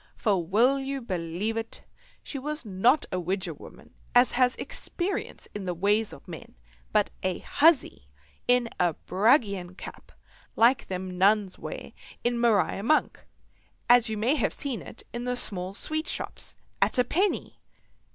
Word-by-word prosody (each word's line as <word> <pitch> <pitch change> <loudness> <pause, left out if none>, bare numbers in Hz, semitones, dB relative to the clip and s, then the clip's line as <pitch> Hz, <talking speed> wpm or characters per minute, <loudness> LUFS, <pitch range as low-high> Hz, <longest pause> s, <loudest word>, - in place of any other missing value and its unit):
For, 195 -6 +1
will 235 +10 +3
you 275 0 -3
believe 185 0 -3
it, 225 0 -5 0.4
she 275 - -5
was 300 +1 -5
not 220 +9 +3
a 185 - -1
widger 185 +2 -2
woman - - -14 0.2
as 245 +1 +6
has 250 0 +3
experience 390 -6 -4
in 205 -2 -5
the 180 -1 -2
ways 205 +5 +1
of - - -13
men, - - -10 0.4
but - - +2
a 185 -1 -1
huzzy 290 - +2 0.4
in 245 -1 +4
a 175 -3 +2
bragian 200 -3 +1
cap - - -10 0.4
like 240 +3 +4
them 185 0 -4
the - - -7
Nuns 195 +1 +2
wear - - -7 0.3
in 240 0 +1
"Mariar 220 -4 +2
Monk," 305 +9 +2 0.7
as 245 -1 +6
you 220 - -2
may 230 +6 +2
have 305 - 0
seen 275 -6 -3
it - - -11
in 240 +1 -4
the 250 0 -1
small 185 -6 -3
sweet 310 - -3
shops, - - -5 0.3
at - - +3
a 250 - +5
penny. 375 +11 -1
225 Hz, 160 wpm, -27 LUFS, 190-255 Hz, 0.7 s, as